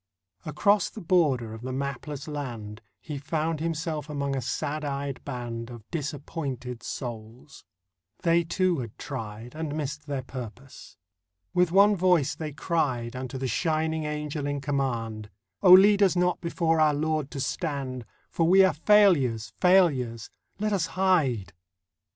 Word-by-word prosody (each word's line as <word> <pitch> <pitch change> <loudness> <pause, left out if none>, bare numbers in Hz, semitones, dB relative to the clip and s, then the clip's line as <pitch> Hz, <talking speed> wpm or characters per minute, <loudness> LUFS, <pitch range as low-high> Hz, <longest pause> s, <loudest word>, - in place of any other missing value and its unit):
Across 200 +6 +2
the - - -10
border 150 - +1
of 110 - -9
the 130 +1 -5
mapless 140 +2 -4
land 120 -8 -6 0.2
He 150 -3 -6
found 155 +2 -2
himself 160 -2 -3
among 140 -2 -2
a 135 - -1
sad 145 +5 -3
eyed 140 -1 -4
band 120 -3 -5
Of 120 -3 -11
disappointed 140 -5 -4
souls; 120 +2 -8 0.6
they, 170 0 +4
too, 175 0 +1
had 115 -4 -7
tried 110 +2 -7
And 155 -1 -4
missed 150 0 -4
their 140 -2 -3
purpose. 125 +1 -10 0.6
With 180 -2 +3
one 200 +3 +6
voice 180 -6 +3
they 155 -2 -5
cried 130 -6 -1
Unto 130 +1 -5
the 130 0 -2
shining 160 +1 0
Angel 150 -1 -3
in 145 0 -2
command: 120 -7 -2 0.3
'Oh, 180 - +8
lead 200 +2 +7
us 190 -3 +4
not 180 0 +1
before 165 -1 +1
our 150 -1 +4
Lord 155 -1 -1
to 140 - -6
stand, 135 -4 -3 0.2
For 165 - 0
we 190 +2 +7
are 185 - +2
failures, 155 - +3
failures! 140 - +3 0.3
Let 210 +1 -1
us 185 -5 +1
hide. 135 - +2
145 Hz, 145 wpm, -27 LUFS, 125-165 Hz, 0.6 s, Oh